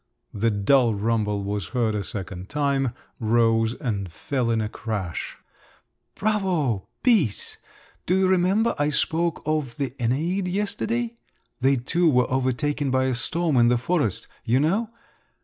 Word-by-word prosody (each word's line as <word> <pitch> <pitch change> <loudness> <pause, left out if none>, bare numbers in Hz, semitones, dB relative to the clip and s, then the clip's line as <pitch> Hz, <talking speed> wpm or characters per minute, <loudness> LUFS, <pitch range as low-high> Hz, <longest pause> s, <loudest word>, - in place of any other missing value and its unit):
The 110 +3 +1
dull 115 +3 +3
rumble 105 -1 0
was 100 -3 -3
heard 115 -3 +2
a 105 -1 -2
second 95 -1 -6
time, 140 -4 0 0.2
rose, 115 0 +2
and 100 -8 -3
fell 120 - -2
in 115 -1 +2
a 110 - -1
crash. 105 -6 -4 0.8
"Bravo! 180 - 0 0.2
Bis! 205 - +2 0.5
Do 185 - +3
you 190 0 +3
remember 190 +5 +3
I 145 0 +2
spoke 165 +3 0
of 150 -6 -1
the 140 -4 -2
Æneid 165 +10 0
yesterday? 225 +4 -1 0.5
They 135 +2 +3
too 165 +8 +2
were 125 -3 +4
overtaken 135 +3 0
by 130 0 +2
a 130 0 +1
storm 165 +4 0
in 120 -1 +6
the 120 0 +4
forest, 135 - -1 0.2
you 120 +3 +2
know. 195 +10 +1
130 Hz, 145 wpm, -24 LUFS, 115-170 Hz, 0.8 s, in